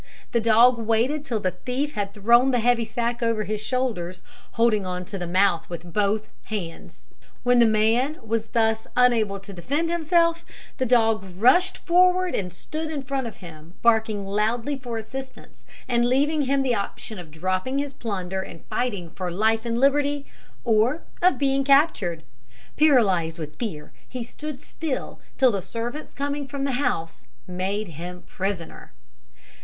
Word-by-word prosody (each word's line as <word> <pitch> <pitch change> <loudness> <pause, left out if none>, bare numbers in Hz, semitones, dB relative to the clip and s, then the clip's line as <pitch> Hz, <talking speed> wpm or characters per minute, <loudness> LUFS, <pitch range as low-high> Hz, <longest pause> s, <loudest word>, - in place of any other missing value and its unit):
The 235 - +2
dog 230 +2 +5
waited 230 +7 +1
till 235 -6 -2
the 185 -2 0
thief 255 - -3
had 200 -1 -2
thrown 235 +5 +5
the 250 - +2
heavy 235 0 +2
sack 235 +2 -2
over 230 -2 +1
his 210 +1 -3
shoulders, 215 -8 -2 0.3
holding 230 -3 +3
on 180 -1 -4
to 195 +1 -6
the 175 - -3
mouth 185 -1 +2
with 170 0 -8
both 210 +1 +1 0.2
hands. 185 -7 -6 0.4
When 245 0 +4
the 235 - +7
man 225 +7 +2
was 225 0 -1
thus 220 -1 +1
unable 225 -5 +3
to 200 0 -10
defend 285 - -1
himself, 335 0 +2 0.4
the 260 - +1
dog 225 -3 +3
rushed 355 - +4
forward 365 +1 +4
and 180 -2 -2
stood 310 - -5
in 295 -3 -4
front 265 -1 -2
of 225 - -9
him, 160 +1 -12
barking 220 -3 +2
loudly 225 +7 0
for 245 -4 -5
assistance, 260 +4 -9 0.2
and 240 -1 +2
leaving 290 +4 +2
him 275 0 +1
the 255 -2 +1
option 215 0 -4
of 170 -3 -10
dropping 185 - -2
his 280 -1 -2
plunder 190 -6 -3
and 165 -3 -10
fighting 200 -9 -2
for 180 +1 -4
life 220 +5 +1
and 230 0 0
liberty, 285 +1 +2 0.4
or 235 +7 +2 0.2
of 365 +1 +4
being 275 -1 +2
captured. 265 - +3 0.5
Paralysed 200 - +3
with 150 -2 -7
fear, 175 -11 -5 0.2
he 255 -2 -4
stood 295 +4 -7
still, 310 -5 -5 0.2
till 260 -2 +5
the 200 -3 -2
servants 235 - -6
coming 285 0 -2
from 280 0 -4
the 275 - 0
house 165 - -2 0.2
made 190 +3 -3
him 175 +3 -8
prisoner. 185 - -5
230 Hz, 160 wpm, -24 LUFS, 195-270 Hz, 0.5 s, the